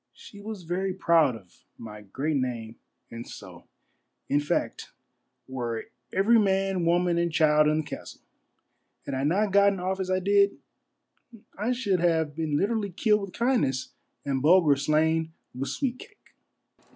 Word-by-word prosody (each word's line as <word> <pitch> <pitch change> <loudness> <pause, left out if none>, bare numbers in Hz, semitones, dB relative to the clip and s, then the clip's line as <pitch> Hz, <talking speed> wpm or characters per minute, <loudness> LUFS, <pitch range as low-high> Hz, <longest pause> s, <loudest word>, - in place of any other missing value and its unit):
She 205 - -13
was 210 -3 -7
very 180 +3 -2
proud 165 -8 +3
of 95 -6 -17
my 105 -2 -10
great 135 +10 -2
name 120 -4 -4 0.3
and 115 +1 -8
so, - - -12 0.6
in 145 - +3
fact, 145 - -3 0.5
were 120 -4 -4 0.2
every 220 +5 +4
man, 195 -3 +1
woman, 175 0 +2
and 170 0 0
child 150 -1 +4
in 155 +1 +2
the - - -9
castle. - - -9 0.8
Had 140 - -5
I 130 0 -2
not 195 +8 +1
gotten 200 -1 +4
off 190 +2 -2
as 185 -1 -3
I 185 - +2
did, 200 +1 +2 1.0
I 215 +5 -1
should 215 -7 0
have 160 -3 +1
been 155 -2 -1
literally 205 +3 0
killed 210 +3 +1
with 195 -2 -7
kindness 230 - 0 0.4
and 135 -2 -1
Bulger 160 -1 +5
slain 160 +3 +1 0.2
with 130 +2 -4
sweetcake. 270 +9 -6
170 Hz, 150 wpm, -26 LUFS, 145-195 Hz, 1.0 s, Bulger